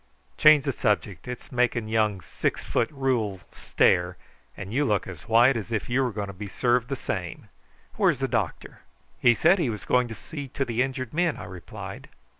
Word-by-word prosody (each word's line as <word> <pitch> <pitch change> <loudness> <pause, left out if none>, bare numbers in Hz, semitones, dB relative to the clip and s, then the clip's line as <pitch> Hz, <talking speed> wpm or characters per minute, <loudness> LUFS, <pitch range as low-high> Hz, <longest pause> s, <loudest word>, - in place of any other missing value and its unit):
Change 155 -2 +6
the 140 - +1
subject; 105 -6 -1
it's 125 -1 -7
making 120 -3 +1
young 110 -3 +1
Six 80 - -3
foot 115 - 0
Rule 125 -9 -1
stare, 90 0 +1 0.4
and 100 +2 -7
you 145 +4 +2
look 105 -8 +1
as 95 +1 -10
white 120 +4 +6
as 115 0 -5
if 115 +2 -2
you 130 +2 +2
were 125 -2 0
going 105 -1 -3
to 100 - -8
be 100 +2 -7
served 120 +4 +1
the 135 - -2
same. - - -5 0.5
Where's - - +3
the - - -1
doctor?" - - -3 0.4
"He 120 -1 +5
said 175 +9 +4
he 155 -8 +1
was 105 -3 -5
going 125 -1 +2
to 110 - -7
see 145 +1 -8
to 135 +2 -2
the 120 0 -1
injured 130 -2 -3
men," 170 0 +1
I - - -8
replied. 90 -3 -9
120 Hz, 200 wpm, -26 LUFS, 105-135 Hz, 0.5 s, Change